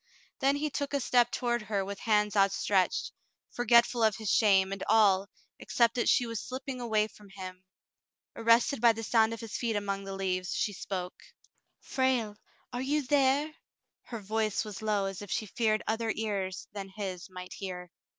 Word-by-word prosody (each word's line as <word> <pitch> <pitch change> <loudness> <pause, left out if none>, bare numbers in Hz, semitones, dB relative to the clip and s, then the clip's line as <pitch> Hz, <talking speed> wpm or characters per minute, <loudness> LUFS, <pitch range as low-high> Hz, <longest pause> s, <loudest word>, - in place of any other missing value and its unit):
Then 275 +1 +3
he 300 +1 -2
took 285 0 -2
a - - +2
step 245 -2 +3
toward 240 -1 -1
her 200 -2 -2
with 200 0 -6
hands 210 -2 +1
outstretched, 195 -1 +2 0.4
forgetful 235 0 +3
of 220 -2 +3
his 215 -3 -2
shame, 195 -3 +4
and 195 -1 -4
all, 200 -3 +4 0.3
except 235 -1 +2
that 240 - +1
she 245 - +4
was 230 -2 -4
slipping 260 0 -6
away 215 -3 +1
from 210 -2 -17
him. 185 -1 -8 0.7
Arrested 230 +2 +3
by 235 -1 +6
the 225 +1 -6
sound 225 0 +3
of 230 - -6
his 225 -2 -7
feet 230 -3 -1
among 200 -1 -2
the 195 0 -5
leaves, 185 -1 -2
she 205 - 0
spoke. 185 -2 -5 0.6
"Frale, 255 -5 0 0.4
are 245 - -2
you 290 +3 0
there?" 285 +2 +2 0.5
Her 230 -3 -7
voice 215 +1 -1
was 210 0 -7
low 210 -2 0
as 195 0 -5
if 205 - -9
she 215 - -1
feared 215 +1 0
other 225 0 0
ears 200 -4 -3
than 195 -2 -6
his 190 -2 -6
might 180 0 -9
hear. 180 -3 -7
215 Hz, 180 wpm, -30 LUFS, 195-240 Hz, 0.7 s, by